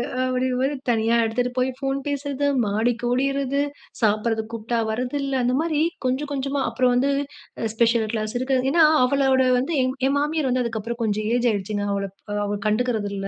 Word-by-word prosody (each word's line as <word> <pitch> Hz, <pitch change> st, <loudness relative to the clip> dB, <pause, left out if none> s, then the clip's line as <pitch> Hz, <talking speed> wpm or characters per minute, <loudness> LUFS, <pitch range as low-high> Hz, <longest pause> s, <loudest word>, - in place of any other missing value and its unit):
ஆ -, -, -4 dB
அப்படிறமாரி 255 Hz, +2 st, 0 dB
தனியா 225 Hz, 0 st, +2 dB
எடுத்துட்டு 245 Hz, +2 st, -1 dB
போய் 255 Hz, +1 st, +2 dB
ஃபோன் 270 Hz, 0 st, -1 dB
பேசுறது, 285 Hz, 0 st, -2 dB, 0.2 s
மாடிக்கு 230 Hz, +4 st, 0 dB
ஓடிர்றது, 275 Hz, +2 st, 0 dB, 0.4 s
சாப்பிடறதுக்கு 220 Hz, +1 st, +1 dB
கூப்பிட்டா 230 Hz, +1 st, -2 dB
வர்றதில்ல. 265 Hz, +4 st, -2 dB
அந்த 250 Hz, +1 st, +1 dB
மாதிரி 315 Hz, -2 st, 0 dB, 0.2 s
கொஞ்சம் 265 Hz, +3 st, -1 dB
கொஞ்சமா 275 Hz, 0 st, -1 dB
அப்புறம் 250 Hz, +2 st, +2 dB
வந்து 275 Hz, +3 st, +2 dB, 0.5 s
அ -, -, -1 dB
ஸ்பெஷல் 230 Hz, -1 st, +2 dB
கிளாஸ் 215 Hz, -1 st, -2 dB
இருக்கு. 260 Hz, +1 st, +1 dB
அது 265 Hz, -, 0 dB
ஏன்னா 330 Hz, +2 st, +5 dB, 0.2 s
அவளோட 265 Hz, 0 st, +3 dB, 0.2 s
வந்து 295 Hz, +6 st, -1 dB
என் 255 Hz, 0 st, 0 dB
என் 275 Hz, -, +1 dB
மாமியார் 300 Hz, -1 st, 0 dB
வந்து 250 Hz, 0 st, +1 dB
அதுக்கப்புறம் 230 Hz, +1 st, -4 dB
கொஞ்சம் 215 Hz, 0 st, -1 dB
ஏஜ் 245 Hz, 0 st, +2 dB
ஆகிடுச்சுங்க, 205 Hz, 0 st, -2 dB
அவள 200 Hz, 0 st, -2 dB, 0.4 s
அவ 205 Hz, 0 st, -2 dB
கண்டுக்கிறதில்ல. 210 Hz, -3 st, -1 dB
250 Hz, 165 wpm, -23 LUFS, 225-275 Hz, 0.5 s, ஏன்னா